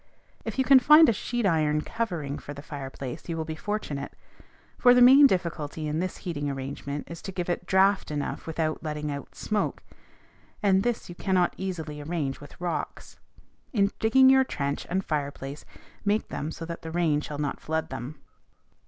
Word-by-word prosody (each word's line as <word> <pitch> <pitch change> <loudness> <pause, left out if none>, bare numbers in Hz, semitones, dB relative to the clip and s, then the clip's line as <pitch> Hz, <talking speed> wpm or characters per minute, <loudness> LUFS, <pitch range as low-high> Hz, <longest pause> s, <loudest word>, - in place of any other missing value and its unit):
If - - -5
you 265 - +3
can 270 0 +8
find 300 +5 +8
a - - +3
sheet 240 +3 -2
iron 155 -4 +2
covering 170 -10 -3
for 145 - -8
the 140 - -9
fireplace, 135 -1 -7
you 165 - -2
will 160 - -2
be 160 - -4
fortunate; 155 -6 -4 0.7
for 245 -1 +7
the - - +6
main 275 +3 +9
difficulty 165 - -2
in 150 +1 -1
this 185 +1 -3
heating 145 -5 -2
arrangement 140 +1 -5
is 170 0 -8
to 195 - -6
give 180 -2 -4
it 175 0 -3
draught 190 +1 +3
enough 150 +1 -4
without 160 -1 -1
letting 150 -1 -3
out 140 -1 -7
smoke, 210 -1 -2 0.8
and 195 -2 +4
this 240 +2 -1
you 175 - -8
cannot 180 0 +1
easily 160 -6 -5
arrange 145 -3 -3
with 145 - -13
rocks. 175 -1 -4 0.5
In 200 -3 +3
digging 260 +4 +5
your 265 0 +7
trench 140 - -3
and 190 +2 -1
fireplace, 140 -1 -4 0.4
make 210 +1 0
them 150 - -4
so 165 +1 -6
that 170 0 -6
the 165 - -7
rain 160 -3 +1
shall 150 -1 -6
not 145 -1 -2
flood 160 0 -2
them. 130 +3 -6
165 Hz, 180 wpm, -27 LUFS, 145-195 Hz, 0.8 s, main